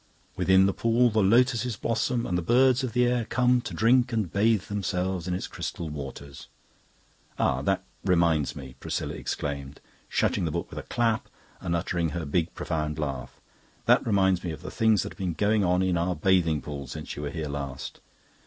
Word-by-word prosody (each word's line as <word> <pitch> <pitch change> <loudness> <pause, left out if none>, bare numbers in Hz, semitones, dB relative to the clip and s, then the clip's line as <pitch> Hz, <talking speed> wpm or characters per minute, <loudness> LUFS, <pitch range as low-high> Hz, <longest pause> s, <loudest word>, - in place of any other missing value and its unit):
Within 95 0 +4
the 100 - +2
pool 115 +1 +3
the 110 - +1
Lotuses 120 +3 +3
blossom, 115 +1 0
and 90 - -1
the 90 - +1
birds 130 - +4
of 125 -4 -3
the 125 0 +3
air 120 -1 +1
come 125 +2 +2
to - - -6
drink 120 +2 +4
and 110 -7 -1
bathe 105 0 +3
themselves 95 -3 -2
in 90 - 0
its 90 - -3
crystal 85 -2 -5
waters...' 70 -1 -8 0.9
Ah, - - +1
and - - -6
that - - +1 0.2
reminds 85 -5 +2
me," 65 -2 -9
Priscilla - - -3
exclaimed, 70 -1 -4 0.3
shutting - - +1
the 85 - 0
book 85 +2 -4
with - - -5
a - - -11
clap 115 -2 0 0.3
and 85 -2 -2
uttering 85 0 -1
her 85 -2 -3
big 80 +3 0
profound 75 -2 -2
laugh 70 -4 -4 0.5
"that - - +5
reminds 95 -4 +2
me 90 - -3
of 80 - -7
the - - -6
things 110 -3 +3
that - - -6
have - - -24
been 90 -3 -1
going 105 +5 +2
on 90 0 +2
in 90 -2 +1
our 90 +1 0
bathing 80 -2 +2
pool 70 -2 -6
since 65 - -7
you - - -6
were 75 - -3
here 80 +1 -4
last. 70 -2 -5
90 Hz, 200 wpm, -27 LUFS, 80-115 Hz, 0.9 s, that